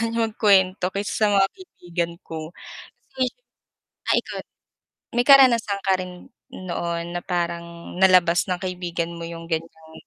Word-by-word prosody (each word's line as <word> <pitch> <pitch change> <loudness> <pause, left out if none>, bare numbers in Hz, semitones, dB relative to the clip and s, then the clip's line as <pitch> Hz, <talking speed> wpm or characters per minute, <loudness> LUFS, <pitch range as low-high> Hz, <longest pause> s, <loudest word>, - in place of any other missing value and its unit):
kanya 230 0 -1
mag-kwento 195 -3 +3
kaysa 200 +1 -3
sa 215 - +3
mga 195 -1 +4
kaibigan 175 - -5
ko. 160 0 -7 0.6
So - - -27 1.0
ay - - +4
ikaw, - - -7 0.8
may 245 - +3
karanasan 235 -7 +6
ka 190 -1 +3
rin 180 -1 -9 0.2
noon 170 -2 -4
na 175 - -2
parang 170 -1 -4
nalabas 180 -2 +5
ng 180 - 0
kaibigan 175 -2 -3
mo 170 - -7
yung 165 0 -8
ganyang 160 -1 -5
180 Hz, 135 wpm, -23 LUFS, 170-195 Hz, 1.0 s, karanasan